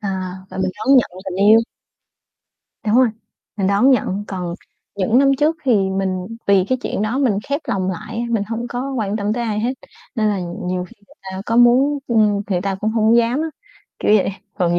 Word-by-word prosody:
à, 190 -2 -4
và - - -9
mình 185 -1 0
đón 265 +5 +4
nhận 245 - +3
tình 185 -1 -5
yêu. 225 +1 +8 1.3
Đúng 215 +3 +3
rồi, 255 -1 +5 0.5
mình 195 -2 0
đón 200 +7 +4
nhận. 205 -6 +1
Còn 180 -3 -4 0.4
những 220 +5 +2
năm 275 0 +4
trước 310 +2 +2
thì 255 - +3 0.2
mình 190 -1 -2 0.2
vì 195 -2 +4
cái 255 0 +1
chuyện 205 - -2
đó 225 +5 -1
mình 235 -8 +2
khép 285 +3 -1
lòng 190 -1 0
lại 190 +5 -7
á, - - -1
mình 225 -3 +1
hông 230 +3 -4
có 255 +3 -4
quan 215 -4 -2
tâm 205 0 -1
tới 240 +1 -2
ai 215 -2 -1
hết, 240 +3 0 0.4
nên 220 -3 +1
là 205 -2 0
nhiều 180 +1 -4
khi - - -18
người - - -21
ta 190 0 -6
có 230 - 0
muốn, 255 +4 +5
ưm, 210 -3 +2
người 180 -2 +1
ta 195 0 -1
cũng 215 - 0
hổng 225 +1 +3
dám 235 +4 +2
á, 320 - -2 0.5
kiểu - - +2
vậy. 195 - 0 0.2
Còn 175 -1 +1
215 Hz, 215 wpm, -19 LUFS, 190-240 Hz, 1.3 s, yêu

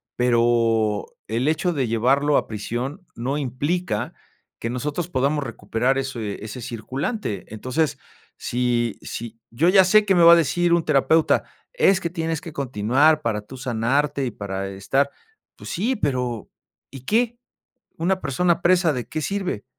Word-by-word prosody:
pero, 115 -3 +2 0.2
el 115 +5 -1
hecho 175 +3 +1
de 135 -5 -1
llevarlo 135 +6 +2
a - - 0
prisión 120 - -5
no 130 +5 -2
implica 145 0 -2 0.5
que 115 - -3
nosotros 150 +7 -3
podamos 145 -1 0
recuperar 120 +3 -1
ese 115 -7 -4
ese 110 +4 -7
circulante. 125 - -4
Entonces, 130 +8 -1 0.4
si 120 -2 -1
si, 115 0 -7
yo 155 +10 +2
ya 190 0 +7
sé 215 +3 +5
que 195 -2 +3
me 175 - +5
va 170 0 +10
a - - +9
decir 170 +2 +2
un 170 -1 +3
terapeuta: 160 +3 +3 0.3
"Es 195 - +4
que 170 - -3
tienes 165 -2 -3
que 170 - -8
continuar 140 +3 +2
para 110 -6 -1
tú 130 +6 -12
sanarte 130 +3 0
y 125 - -2
para 95 -2 -5
estar", 135 +9 0 0.5
pues - - -9
sí, 230 +9 0
pero, 125 - -2 0.4
¿y 135 -1 -9
qué?, 230 - +1 0.6
una 185 +3 0
persona 170 +5 +1
presa, 175 -2 +4
¿de 125 -3 -4
qué 155 - -3
sirve?, 190 - -3
135 Hz, 155 wpm, -23 LUFS, 115-165 Hz, 0.6 s, va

